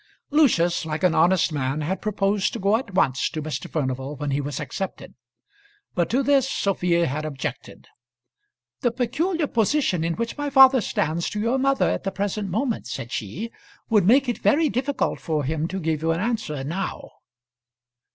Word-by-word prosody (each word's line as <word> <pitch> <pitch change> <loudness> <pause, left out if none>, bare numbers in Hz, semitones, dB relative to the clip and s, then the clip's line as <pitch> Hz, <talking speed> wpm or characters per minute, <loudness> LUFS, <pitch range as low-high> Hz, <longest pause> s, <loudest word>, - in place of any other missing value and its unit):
Lucius, 175 - +3
like 160 +2 -4
an 180 -2 +4
honest 175 +1 +3
man, 140 0 -1
had 180 +6 -2
proposed 200 -1 0
to - - -5
go 200 +3 +3
at 225 -5 -4
once 135 -6 +2
to 155 - -5
Mr. 155 0 -5
Furnival 135 -1 -3
when 145 0 -3
he 140 +1 0
was 145 +2 -4
accepted; 150 +6 -5 0.8
but 175 -2 0
to 265 +4 +1
this 275 -1 +3
Sophia 180 -7 +1
had 150 +2 -2
objected, 145 -4 -6 0.9
"The 245 - +2
peculiar 305 +8 -1
position 225 - +1
in 165 0 -1
which 230 +5 -4
my 290 0 -1
father 265 -2 +7
stands 170 -3 -1
to 210 - -4
your 235 +5 +1
mother 275 +1 +2
at - - -1
the 195 - -1
present 200 0 -2
moment," 225 +5 -1
said 120 - -6
she, 155 - -4 0.4
"would 210 -5 +4
make 265 +4 +5
it 240 - -2
very 310 +1 +3
difficult 270 +2 -1
for 155 -3 -1
him 155 +3 -1
to 190 +2 -4
give 160 -3 -1
you 165 - 0
an 165 0 +1
answer 200 - -2
now." 180 +7 -4
190 Hz, 180 wpm, -24 LUFS, 155-240 Hz, 0.9 s, father